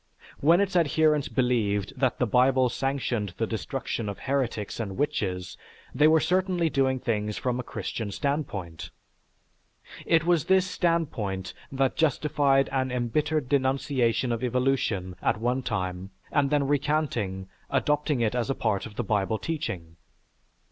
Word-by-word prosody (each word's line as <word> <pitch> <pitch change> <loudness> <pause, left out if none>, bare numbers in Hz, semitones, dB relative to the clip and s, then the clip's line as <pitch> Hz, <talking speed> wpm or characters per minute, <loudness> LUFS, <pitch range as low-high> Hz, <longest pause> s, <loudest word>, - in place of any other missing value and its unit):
When 165 +5 +5
its 195 -2 -1
adherents 155 -3 +3
believed 110 -6 0
that 130 -3 +1
the 125 - +1
Bible 125 +2 +3
sanctioned 120 -8 -2
the 115 - 0
destruction 115 0 -3
of 100 - -5
heretics 130 -7 -2
and 100 -4 -4
witches, 95 - -2 0.3
they 150 - +5
were 160 0 +5
certainly 180 -1 +1
doing 130 -1 +1
things 105 -3 -2
from 125 -1 -1
a - - -3
Christian 110 -2 -4
standpoint. 100 - -3 1.2
It 165 -1 +3
was 170 -4 +2
this 190 -1 +4
standpoint 140 - -1 0.2
that 135 -1 +1
justified 145 -3 +2
an 130 -1 0
embittered 145 +4 0
denunciation 130 -2 +1
of 115 +1 -2
evolution 125 -7 0
at 105 - +1
one 125 +3 0
time 95 -5 -3 0.2
and 140 -2 +2
then 145 -1 +2
recanting, 135 -10 -1 0.2
adopted 150 0 +1
it 110 - +1
as 125 +1 -1
a 135 - 0
part 105 -2 -1
of 105 - -13
the 120 - -2
Bible 105 +1 0
teaching. 100 - -4
130 Hz, 140 wpm, -27 LUFS, 105-145 Hz, 1.2 s, When